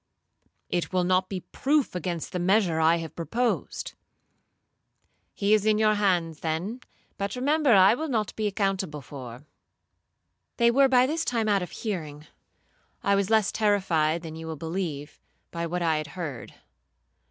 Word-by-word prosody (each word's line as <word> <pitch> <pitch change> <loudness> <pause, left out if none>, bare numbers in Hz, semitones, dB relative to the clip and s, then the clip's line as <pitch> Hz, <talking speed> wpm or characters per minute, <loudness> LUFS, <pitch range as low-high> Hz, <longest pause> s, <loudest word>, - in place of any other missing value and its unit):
—'It 175 +1 -1
will 185 -1 +1
not 185 +1 +1
be 190 -2 -4
proof 285 - 0
against 175 -2 -4
the 180 - -3
measure 180 -2 +2
I 160 +1 +4
have 165 -2 -6
proposed.'—'He 215 0 -5
is 215 -2 +4
in 215 0 +3
your 215 0 +4
hands 180 -6 0
then; 175 +10 -3 0.4
but 200 +2 -2
remember 285 +1 +2
I 190 +1 +7
will 315 +6 -3
not 220 -7 -1
be 215 -1 -1
accountable 190 -7 -2
for—' 125 0 -9 1.1
They 235 -1 +4
were 275 +3 +5
by 255 -1 +4
this 320 +4 -1
time 230 -3 0
out 200 -2 +2
of 180 - -5
hearing. 155 -9 -5 0.8
I 200 - +3
was 200 0 +1
less 220 -3 +3
terrified 175 -7 +1
than 160 -1 -7
you 160 0 -8
will 160 - -4
believe, 160 -2 -5 0.3
by 170 0 -3
what 175 +1 -2
I 160 -2 +2
had 155 0 -4
heard. 145 -9 -6
185 Hz, 155 wpm, -26 LUFS, 165-215 Hz, 1.1 s, I